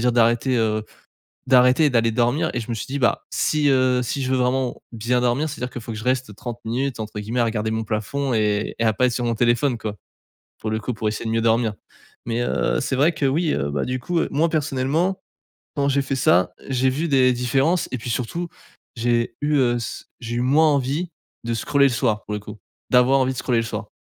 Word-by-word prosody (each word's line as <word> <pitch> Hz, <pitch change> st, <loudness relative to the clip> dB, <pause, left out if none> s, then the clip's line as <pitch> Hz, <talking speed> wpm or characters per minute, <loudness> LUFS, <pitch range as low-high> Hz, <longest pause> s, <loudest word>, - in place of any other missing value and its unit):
dire 125 Hz, -, +3 dB
d'arrêter, 120 Hz, +2 st, +2 dB
heu 110 Hz, -1 st, 0 dB, 0.6 s
d'arrêter 125 Hz, +3 st, +5 dB
et -, -, +4 dB
d'aller 115 Hz, -1 st, +3 dB
dormir 125 Hz, +8 st, +1 dB
et -, -, 0 dB
je 115 Hz, -, -9 dB
me -, -, -1 dB
suis 110 Hz, -, -5 dB
dit: 140 Hz, +2 st, -3 dB
«Bah, 120 Hz, -, +1 dB
si 150 Hz, -1 st, +1 dB
heu 130 Hz, -1 st, +3 dB
si 130 Hz, +3 st, -2 dB
je 130 Hz, -, -1 dB
veux 130 Hz, -, +2 dB
vraiment 125 Hz, 0 st, 0 dB
bien 120 Hz, +2 st, 0 dB
dormir 125 Hz, +6 st, +1 dB
c'est-à-dire 125 Hz, -3 st, -5 dB
qu'il 125 Hz, -, -6 dB
faut 115 Hz, -, -7 dB
que -, -, -6 dB
je 110 Hz, -, -7 dB
reste 130 Hz, -5 st, -1 dB
30 120 Hz, 0 st, -6 dB
minutes 125 Hz, +2 st, -2 dB
entre 110 Hz, -1 st, -5 dB
guillemets 110 Hz, +4 st, -3 dB
à -, -, +3 dB
"regarder 110 Hz, -1 st, -1 dB
mon 110 Hz, 0 st, -1 dB
plafond" 120 Hz, +6 st, -2 dB
et 105 Hz, -1 st, 0 dB
et -, -, +1 dB
à 110 Hz, -, +3 dB
pas 125 Hz, +4 st, +2 dB
être -, -, 0 dB
sur 120 Hz, -, -2 dB
mon 115 Hz, -1 st, 0 dB
téléphone,» 120 Hz, +2 st, +2 dB
quoi. 105 Hz, -2 st, -5 dB, 0.6 s
pour 110 Hz, -, -3 dB
le 110 Hz, -, -1 dB
coup, 125 Hz, +3 st, -3 dB
pour 110 Hz, -, -2 dB
essayer 110 Hz, -, -5 dB
de 110 Hz, -, -1 dB
mieux 115 Hz, 0 st, +1 dB
dormir. 115 Hz, -1 st, +2 dB, 0.5 s
Mais 115 Hz, +1 st, -1 dB
heu, -, -, 0 dB
c'est 135 Hz, -, -1 dB
vrai 155 Hz, +5 st, +4 dB
que, 150 Hz, -2 st, -2 dB
oui, 155 Hz, +4 st, +1 dB
heu 70 Hz, +1 st, -1 dB
bah 70 Hz, -, -1 dB
du 130 Hz, 0 st, -2 dB
coup, 170 Hz, +6 st, -1 dB
moi 160 Hz, +3 st, +2 dB
personnellement, 155 Hz, +5 st, 0 dB, 0.6 s
quand 140 Hz, -1 st, +1 dB
j'ai 140 Hz, +1 st, +2 dB
fait 135 Hz, 0 st, -2 dB
ça, 90 Hz, -7 st, +3 dB, 0.2 s
j'ai 130 Hz, 0 st, +2 dB
vu 150 Hz, +6 st, -1 dB
des 130 Hz, -2 st, +4 dB
différences 135 Hz, +8 st, +1 dB
et 130 Hz, -, -2 dB
puis 120 Hz, -, -7 dB
surtout 165 Hz, +10 st, -2 dB, 0.5 s
j'ai 120 Hz, 0 st, 0 dB
eu, 150 Hz, 0 st, +2 dB
heu, 120 Hz, -3 st, +3 dB
s 120 Hz, -, -5 dB
j'ai 120 Hz, 0 st, -4 dB
eu -, -, 0 dB
moins 150 Hz, +5 st, +4 dB
envie 140 Hz, +6 st, -1 dB, 0.3 s
de 115 Hz, -, -2 dB
scroller 140 Hz, +5 st, +2 dB
le 130 Hz, -, +1 dB
soir 110 Hz, -3 st, 0 dB
pour 105 Hz, -, -6 dB
le 105 Hz, -, -3 dB
coup 105 Hz, +1 st, -10 dB, 0.3 s
d'avoir 125 Hz, +2 st, +5 dB
envie 130 Hz, 0 st, +1 dB
de -, -, -8 dB
scroller 125 Hz, -3 st, +1 dB
le -, -, -2 dB
soir. 105 Hz, -2 st, -5 dB
125 Hz, 240 wpm, -22 LUFS, 115-135 Hz, 0.6 s, d'arrêter